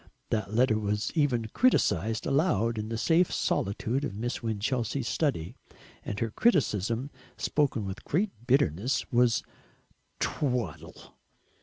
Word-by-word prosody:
That 105 -3 -1
letter 110 -1 +3
was 105 +1 -1
even 125 -8 +1
criticised 110 - +2
aloud 120 - +1
in 105 +1 -4
the 115 - -2
safe 165 +9 +3
solitude 115 +7 -1
of 120 -9 -3
Miss 120 +4 -3
Winchelsea's 115 +3 -1
study, 115 - -1 0.5
and 100 - -4
her 115 -1 -1
criticism, 120 - +1 0.3
spoken 140 -8 0
with 95 0 -6
great 195 +7 0 0.2
bitterness, 125 - +2
was 120 -2 +3 0.8
"Twaddle!" 125 - -3
115 Hz, 120 wpm, -28 LUFS, 105-140 Hz, 0.8 s, letter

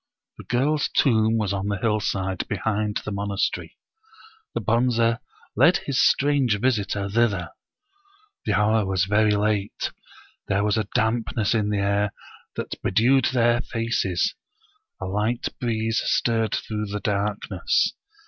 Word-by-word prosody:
The - - -10
girl's 145 +5 +1
tomb 110 -3 +3
was 105 -3 0
on 100 0 -2
the 100 -1 -1
hillside, 95 -3 -1
behind 105 -1 -1
the - - -4
monas 100 0 0
tery. - - -8 0.8
The - - +1
Bonze 115 0 +2 0.4
led - - +5
his 135 -2 -1
strange 135 -7 +3
visitor 105 -5 0
thither. 100 -5 0 1.0
The - - +2
hour 110 +1 +3
was 95 -1 0
very 105 +1 +3
late; 105 -1 -1 0.6
there 100 +1 +1
was 105 0 +2
a 110 -1 -1
dampness 110 -1 +1
in 105 -2 +1
the 105 - 0
air 100 +1 +1 0.4
that - - -5
be - - 0
dewed 120 +6 +4
their 120 -1 +2
faces; 115 -8 -1 0.7
a - - -4
light 105 +5 -1
breeze 115 -2 0
stirred 115 -2 +1
through 105 -1 -3
the 105 +1 -4
dark 100 +1 -1
ness. 90 -3 +1
105 Hz, 140 wpm, -24 LUFS, 100-115 Hz, 1.0 s, led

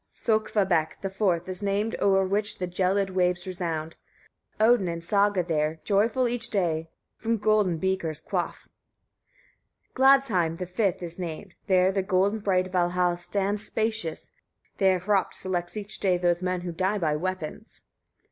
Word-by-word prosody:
7. 220 -1 0
Sökkvabekk 185 -7 0
the 195 - -3
fourth 185 -4 0
is 185 +1 -3
named 205 +2 0
o'er 195 -1 +4
which 205 +2 -1
the 185 - -2
gelid 190 +2 0
waves 180 -1 0
resound; 165 -4 -4 0.6
Odin 220 -3 +4
and 170 -1 -4
Saga 200 +1 +2
there, 160 -1 -1
joyful 220 +5 +2
each 245 0 -2
day, 165 -5 -1 0.3
from 230 0 -1
golden 210 -5 +2
beakers 180 -4 -1
quaff. - - -4 1.2
8. - - -45
Gladsheim 255 -12 +3
the 180 - -4
fifth 185 0 -1
is 170 +1 -7
named, 175 +2 -6
there 185 -1 +4
the 195 0 0
golden 195 +3 +1
bright 185 -3 0
Valhall 180 -1 +1
stands 200 +3 -2
spacious, 215 -7 -2 0.5
there 190 -1 +4
Hropt 195 +2 0
selects 180 +1 -2
each 210 0 -5
day 185 -2 +2
those 175 0 +1
men 185 -1 -1
who 175 0 -4
die 190 +5 0
by 155 -6 0
weapons. 185 +4 -5
185 Hz, 155 wpm, -26 LUFS, 175-205 Hz, 1.2 s, o'er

